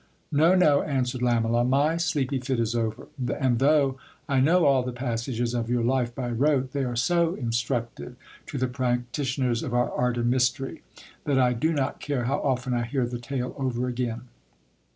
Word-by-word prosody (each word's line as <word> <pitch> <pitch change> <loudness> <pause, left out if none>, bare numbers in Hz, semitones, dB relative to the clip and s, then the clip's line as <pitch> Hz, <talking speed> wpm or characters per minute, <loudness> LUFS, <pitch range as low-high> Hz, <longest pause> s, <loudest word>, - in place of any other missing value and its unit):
No, 160 +5 +4
no, 150 -6 +4
answered 130 -3 -1
Lamela, 120 -1 +2
my 140 +5 +2
s.eepy 145 -6 -1
fit 130 -1 -1
is 115 0 0
over; 115 0 -3 0.3
and 130 -4 +2
though 140 -1 +3 0.3
I 140 -3 +2
know 165 +6 +4
all 135 -2 +4
the 125 0 -4
passages 120 -1 -2
of 120 -1 -2
your 120 -1 +1
life 120 -1 0
by 125 -2 -3
rote, 135 +1 +1
they 140 -1 0
are 120 -1 -3
so 170 +7 +2
instructive 120 0 -3 0.3
to 145 - -5
the 130 0 0
practitioners 125 0 -1
of 120 - -3
our 120 0 +1
art 125 -1 0
and 120 0 +1
mystery, 130 +1 0 0.4
that 140 -2 +1
I 125 -1 +4
do 140 +8 0
not 140 -4 -1
care 140 -4 -2
how 135 +4 0
often 130 -2 -1
I 120 - +1
hear 130 +1 -1
the 120 0 -5
tale 125 0 -4
over 125 -2 -1
again. 120 -2 -3
125 Hz, 185 wpm, -26 LUFS, 120-140 Hz, 0.4 s, No